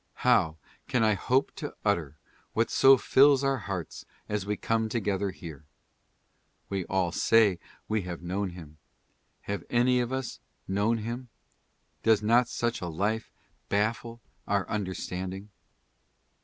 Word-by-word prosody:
How 80 Hz, 0 st, +4 dB, 0.3 s
can 125 Hz, -4 st, +1 dB
I 110 Hz, -1 st, +4 dB
hope 125 Hz, +7 st, +1 dB
to 150 Hz, -, -6 dB
utter 80 Hz, -8 st, 0 dB, 0.4 s
what -, -, +1 dB
so 135 Hz, 0 st, +7 dB
fills 140 Hz, +2 st, +5 dB
our 135 Hz, -1 st, +1 dB
hearts 95 Hz, -6 st, -5 dB, 0.2 s
as 105 Hz, -2 st, -3 dB
we 105 Hz, 0 st, -1 dB
come 110 Hz, -1 st, 0 dB
together 100 Hz, -3 st, -1 dB
here? 80 Hz, -6 st, -9 dB, 1.1 s
We 95 Hz, -2 st, -2 dB
all 95 Hz, -2 st, 0 dB
say 105 Hz, -2 st, +4 dB, 0.3 s
we 110 Hz, -1 st, 0 dB
have 90 Hz, -2 st, -7 dB
known 95 Hz, +3 st, -2 dB
him. 80 Hz, -4 st, -12 dB, 0.6 s
Have 100 Hz, 0 st, -4 dB
any 125 Hz, +1 st, +3 dB
of 120 Hz, 0 st, -1 dB
us 130 Hz, -1 st, -4 dB, 0.3 s
known 105 Hz, +4 st, +1 dB
him? 120 Hz, +3 st, -5 dB, 0.7 s
Does 110 Hz, -1 st, +3 dB
not 120 Hz, +3 st, +4 dB
such 120 Hz, -2 st, -2 dB
a 90 Hz, -, -3 dB
life 105 Hz, +7 st, -2 dB, 0.4 s
baffle 115 Hz, +3 st, -1 dB, 0.3 s
our 100 Hz, -2 st, 0 dB
understanding? 95 Hz, 0 st, -4 dB
105 Hz, 135 wpm, -28 LUFS, 95-120 Hz, 1.1 s, so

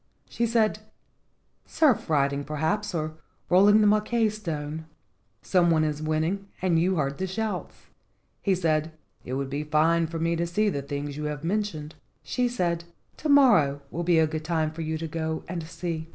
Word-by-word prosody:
She 235 Hz, -, -1 dB
said: 220 Hz, -2 st, +2 dB, 0.9 s
"Surf 285 Hz, -, +2 dB
riding, 140 Hz, -2 st, +1 dB
perhaps, 160 Hz, +7 st, -2 dB
or 155 Hz, -1 st, -3 dB, 0.3 s
rolling 205 Hz, +4 st, +6 dB
the -, -, +4 dB
maika 215 Hz, +1 st, +2 dB
stone. 160 Hz, -6 st, -5 dB, 0.6 s
Some 180 Hz, -2 st, +3 dB
one 160 Hz, -1 st, +3 dB
is 150 Hz, -1 st, -2 dB
winning 160 Hz, +6 st, -1 dB
and 175 Hz, -3 st, +2 dB
you 185 Hz, +3 st, +2 dB
heard 140 Hz, -3 st, -1 dB
the 190 Hz, -, -1 dB
shouts." 215 Hz, +3 st, -3 dB, 0.7 s
He 195 Hz, -2 st, +2 dB
said, 160 Hz, -2 st, 0 dB, 0.3 s
"It 125 Hz, -, -6 dB
would 135 Hz, 0 st, -3 dB
be 145 Hz, +2 st, -2 dB
fine 160 Hz, +2 st, +2 dB
for 165 Hz, +1 st, -5 dB
me 165 Hz, +1 st, 0 dB
to 170 Hz, +1 st, -1 dB
see 210 Hz, +5 st, +1 dB
the 140 Hz, -7 st, -2 dB
things 145 Hz, +1 st, -5 dB
you 150 Hz, -, -4 dB
have 150 Hz, 0 st, -4 dB
mentioned." 170 Hz, -5 st, -2 dB, 0.3 s
She 250 Hz, -1 st, 0 dB
said, 170 Hz, -8 st, -1 dB, 0.3 s
"To 310 Hz, -, -3 dB
morrow 160 Hz, -, +5 dB
will 170 Hz, -, -3 dB
be 175 Hz, -1 st, +3 dB
a 160 Hz, -, +5 dB
good 155 Hz, 0 st, -4 dB
time 160 Hz, -1 st, 0 dB
for 160 Hz, +1 st, -7 dB
you 160 Hz, 0 st, -2 dB
to 165 Hz, +1 st, -4 dB
go 160 Hz, 0 st, -3 dB
and 175 Hz, -1 st, -4 dB
see." 165 Hz, -1 st, -5 dB
165 Hz, 180 wpm, -26 LUFS, 155-195 Hz, 0.9 s, rolling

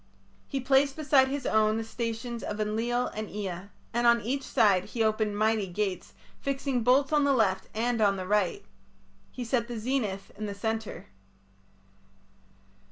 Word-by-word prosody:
He 275 Hz, -, -2 dB
placed 270 Hz, +1 st, +3 dB
beside 285 Hz, -4 st, +4 dB
his 275 Hz, -1 st, -3 dB
own 215 Hz, 0 st, +3 dB
the 225 Hz, -, -2 dB
stations 230 Hz, +1 st, -4 dB
of 210 Hz, -, -5 dB
Enlil 230 Hz, +4 st, 0 dB
and 215 Hz, 0 st, -6 dB
Ea, 195 Hz, -2 st, -5 dB, 0.2 s
and 240 Hz, +1 st, +2 dB
on 235 Hz, 0 st, +6 dB
each 265 Hz, +6 st, -2 dB
side 205 Hz, -9 st, +3 dB
he 230 Hz, -, -2 dB
opened 215 Hz, -1 st, 0 dB
mighty 215 Hz, -1 st, +1 dB
gates, 190 Hz, 0 st, -3 dB, 0.2 s
fixing 275 Hz, -2 st, -1 dB
bolts 265 Hz, +5 st, +3 dB
on 295 Hz, -1 st, +4 dB
the 280 Hz, -1 st, +3 dB
left 195 Hz, -5 st, +1 dB
and 230 Hz, +1 st, 0 dB
on 200 Hz, -2 st, +4 dB
the 185 Hz, -1 st, -5 dB
right. 205 Hz, -2 st, 0 dB, 0.7 s
He 250 Hz, -, -6 dB
set 235 Hz, -1 st, 0 dB
the 240 Hz, -1 st, -5 dB
zenith 215 Hz, -5 st, -2 dB
in 210 Hz, +1 st, -5 dB
the 200 Hz, -, -5 dB
centre. 220 Hz, +1 st, -3 dB
225 Hz, 165 wpm, -28 LUFS, 210-250 Hz, 0.7 s, on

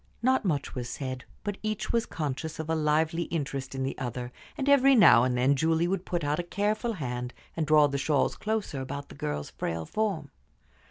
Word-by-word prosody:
Not 260 Hz, +1 st, +3 dB
much 150 Hz, -6 st, -1 dB
was 120 Hz, -2 st, -4 dB
said, 130 Hz, -2 st, -5 dB, 0.2 s
but 205 Hz, -1 st, -3 dB
each 215 Hz, 0 st, -2 dB
was 230 Hz, -1 st, +1 dB
conscious 155 Hz, 0 st, -4 dB
of 160 Hz, 0 st, -3 dB
a -, -, +2 dB
lively 160 Hz, +2 st, +1 dB
interest 140 Hz, -5 st, -3 dB
in 135 Hz, -, -2 dB
the 135 Hz, -, -2 dB
other, 125 Hz, -1 st, -4 dB, 0.3 s
and 275 Hz, -, -2 dB
every 275 Hz, -1 st, +6 dB
now 120 Hz, -, +8 dB
and 125 Hz, -1 st, +1 dB
then 130 Hz, +3 st, +4 dB
Julie 160 Hz, +3 st, +2 dB
would 185 Hz, 0 st, -1 dB
put 175 Hz, -2 st, -1 dB
out 145 Hz, +2 st, 0 dB
a -, -, 0 dB
careful 210 Hz, +6 st, -1 dB
hand 125 Hz, -, -4 dB, 0.2 s
and 160 Hz, -2 st, -1 dB
draw 155 Hz, 0 st, +6 dB
the 140 Hz, -1 st, -1 dB
shawls 145 Hz, 0 st, +1 dB
closer 215 Hz, -10 st, -2 dB
about 140 Hz, +2 st, -6 dB
the -, -, -10 dB
girl's 75 Hz, 0 st, -4 dB
frail 80 Hz, -1 st, -3 dB
form. 190 Hz, -, -2 dB
155 Hz, 205 wpm, -28 LUFS, 130-195 Hz, 0.3 s, now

